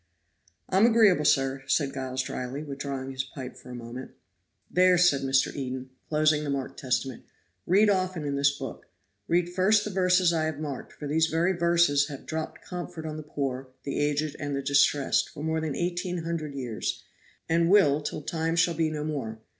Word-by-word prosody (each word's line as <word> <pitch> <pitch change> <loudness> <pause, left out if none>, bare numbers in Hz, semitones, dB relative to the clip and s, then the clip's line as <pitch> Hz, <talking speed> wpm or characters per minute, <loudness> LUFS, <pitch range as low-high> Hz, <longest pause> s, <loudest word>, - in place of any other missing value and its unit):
"I'm 195 +5 +4
agreeable, 215 -9 +4
sir," 135 0 +2
said 140 -2 +1
Giles 130 -1 -3
dryly, 130 +3 -5
withdrawing 140 -2 -5
his 130 0 -2
pipe 130 -1 -8
for - - -14
a 125 - -7
moment. 120 +2 -7 0.6
"There," 180 0 +4
said 170 -6 +4
Mr. 135 0 +2
Eden, 130 -1 -5 0.2
closing 150 -1 +3
the 145 - -3
marked 135 -1 -3
Testament, 130 -1 -2 0.4
"read 200 +4 +5
often 185 -5 0
in 140 -1 -1
this 140 0 +4
book. - - -7 0.4
Read 175 +1 +1
first 205 +3 +3
the 210 - -3
verses 180 -2 +3
I 160 -1 +1
have 155 -2 -3
marked, 145 -4 -5
for 150 - -8
these 160 +2 +2
very 165 +4 +1
verses 170 -5 +3
have 140 -3 -9
dropped 160 0 -5
comfort 175 -3 -6
on 155 -1 -4
the - - -5
poor, 135 -3 -4 0.2
the 140 - -3
aged 145 0 0
and 145 -1 -3
the 140 - -3
distressed 140 0 +3
for 150 - -8
more 160 0 0
than 155 -3 -2
eighteen 175 0 -2
hundred 160 -4 -4
years, 120 -5 -3 0.4
and 165 +1 +2
will 155 -8 +5
till 150 0 -5
time 165 +1 -1
shall 170 0 +3
be 160 0 +1
no 150 -1 -4
more. 135 -8 -4
150 Hz, 185 wpm, -27 LUFS, 135-170 Hz, 0.6 s, read